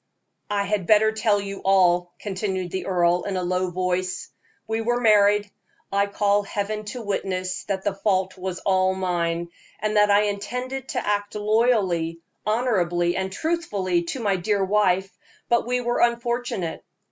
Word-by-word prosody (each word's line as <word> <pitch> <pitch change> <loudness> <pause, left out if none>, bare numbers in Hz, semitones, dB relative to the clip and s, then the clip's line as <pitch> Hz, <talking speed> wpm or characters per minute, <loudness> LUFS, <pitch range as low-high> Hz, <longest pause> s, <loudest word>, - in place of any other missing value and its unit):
"I 205 -1 +1
had 200 -3 -1
better 220 0 +5
tell 215 -1 +1
you 200 0 -5
all," 180 -2 +3
continued 190 -3 -3
the 190 - -4
earl, 175 -1 +2
in 195 -2 -2
a 180 - -1
low 180 +1 0
voice. 185 +1 -2 0.4
"We 220 +1 -1
were 240 +2 0
married. 210 -2 +4 0.4
I 200 +1 +2
call 205 0 +2
Heaven 210 +1 -3
to 235 +3 -6
witness 185 -3 -2
that 195 -2 -2
the 205 - 0
fault 190 -2 0
was 185 -1 -4
all 190 -1 +2
mine, 170 -2 -1 0.3
and 215 +1 0
that 210 0 +5
I 205 0 +5
intended 250 +6 -3
to - - -3
act 205 0 -1
loyally, 210 -7 +1 0.3
honorably, 180 -7 +1
and 190 0 -2
truthfully 200 - -1
to 255 - -4
my 200 -3 +1
dear 195 +2 0
wife; 195 -2 +1 0.3
but 235 -1 +2
we 250 0 0
were 240 0 -1
unfortunate. 235 -6 -1
200 Hz, 160 wpm, -24 LUFS, 185-215 Hz, 0.4 s, better